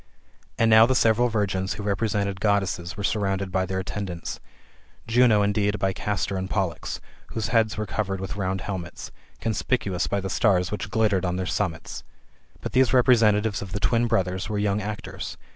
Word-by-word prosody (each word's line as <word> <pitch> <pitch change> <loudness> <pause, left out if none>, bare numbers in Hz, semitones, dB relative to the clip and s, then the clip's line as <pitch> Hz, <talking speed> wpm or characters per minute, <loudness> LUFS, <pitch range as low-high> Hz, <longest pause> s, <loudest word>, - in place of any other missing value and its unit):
And 115 - +3
now 110 +1 +8
the 130 - +1
several 115 +1 +4
virgins 95 -4 -1
who 105 - -6
represented 100 -1 -1
Goddesses 100 -4 0
were 100 - -4
surrounded 100 -2 -1
by 95 0 0
their 95 +1 -3
attendants: 95 -2 -4 0.7
Juno 115 -3 +4
indeed 105 0 +1
by 95 -1 0
Castor 100 0 -2
and 95 0 -3
Pollux, 95 -5 -2 0.3
whose 110 - -3
heads 110 -3 +2
were 110 - -2
CQvered 95 -2 -2
with 95 +1 -5
round 95 -1 -2
helmets, 90 -4 -6 0.3
conspicuous 110 -4 -1
by 100 - 0
the 95 - -4
stars 95 -2 +2
which 105 0 -4
glittered 105 -4 +1
on 90 0 -1
{heir 95 - -2
summits. 80 -3 -3 0.6
But - - -4
those 130 -1 +3
representatives 110 -4 +4
of 95 -2 -7
the 105 - -2
twin 115 +6 +2
brothers 95 -3 0
were 105 - -2
young 100 0 0
actors. 105 +1 -6
100 Hz, 175 wpm, -25 LUFS, 95-110 Hz, 0.7 s, now